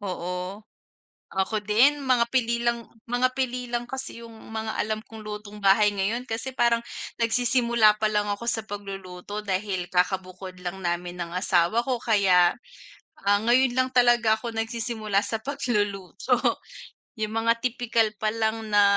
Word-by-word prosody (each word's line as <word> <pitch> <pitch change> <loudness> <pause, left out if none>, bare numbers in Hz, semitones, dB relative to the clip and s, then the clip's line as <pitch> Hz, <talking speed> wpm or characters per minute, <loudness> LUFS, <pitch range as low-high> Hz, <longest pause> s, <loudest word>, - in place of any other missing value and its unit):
Oo. 180 +1 -4 0.7
Ako 190 +3 -1
din 240 +8 +4
mga 245 -2 +4
pili 235 -2 +1
lang 235 -1 0 0.2
mga 255 +2 0
pili 250 -1 -2
lang 240 0 -2
kasi 245 -1 -6
'yung 230 - -11 0.2
mga 220 0 -4
alam 215 0 -1
kong 220 -2 -11
lutong 210 0 -7
bahay 205 +1 +5
ngayon, 205 +5 -1
kasi 250 +2 -5
parang 235 -1 +3 0.4
nagsisimula 235 -2 +3
palang 210 -1 +1
ako 220 +4 -4
sa 225 -1 0
pagluluto, 200 -1 -7
dahil 190 -2 -2
kaka-bukod 185 0 -1
lang 180 +2 -4
namin 175 0 -3
ng 170 -1 -4
asawa 180 +4 +2
ko. 250 -2 -1
Kaya, 190 -6 +4 0.7
ah, 200 0 +5
ngayon 245 +1 +3
lang 255 0 +2
talaga 240 -3 +4
ako 230 0 -6
nagsisimula 225 -2 -1
sa 220 -1 -3
pagluluto. 210 -9 -1 0.8
'Yung 215 -1 -3
mga 230 +1 +3
tipikal 235 -3 +1
palang 220 0 -1
na 205 -1 +5
220 Hz, 140 wpm, -26 LUFS, 200-235 Hz, 0.8 s, bahay